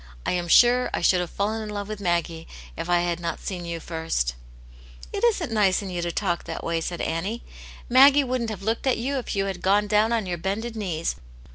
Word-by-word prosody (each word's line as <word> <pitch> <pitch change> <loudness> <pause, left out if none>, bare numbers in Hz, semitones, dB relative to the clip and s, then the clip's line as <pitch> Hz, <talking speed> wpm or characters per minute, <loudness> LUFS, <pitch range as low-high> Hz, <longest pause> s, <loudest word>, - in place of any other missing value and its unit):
" - - -21
I - - +1
am 175 -1 -1
sure 245 +7 +5
I - - -2
should 180 +1 +4
have 175 -1 -2
fallen 215 +2 -2
in 215 - -6
love 205 -1 -4
with 215 -1 -6
Maggie 170 -3 -1 0.3
if 175 - -5
I 175 0 +4
had 175 -1 -1
not 170 -1 -3
seen 180 -3 -5
you 170 -1 -4
first/' 160 - -2 0.4
'* - - -18
It 405 - -3
isn't 405 - +2
nice 205 -3 +2
in 190 - -6
you 175 -1 -3
to 170 0 -2
talk 175 -2 -1
that - - -6
way," 165 -1 -1
said 175 +1 -4
Annie. 195 +8 -2 0.3
" - - -16
Maggie 275 +3 +7
wouldn't 250 -3 -2
have 200 -3 -6
looked 225 +5 -1
at 260 - +3
you 270 +4 -2
if 240 - -5
you 195 0 +1
had 190 -2 -4
gone 205 +2 +3
down 210 +2 +2
on 230 -3 +1
your 175 -2 -3
bended 220 +6 -3
knees. 175 -7 -2
195 Hz, 245 wpm, -25 LUFS, 170-225 Hz, 0.4 s, Maggie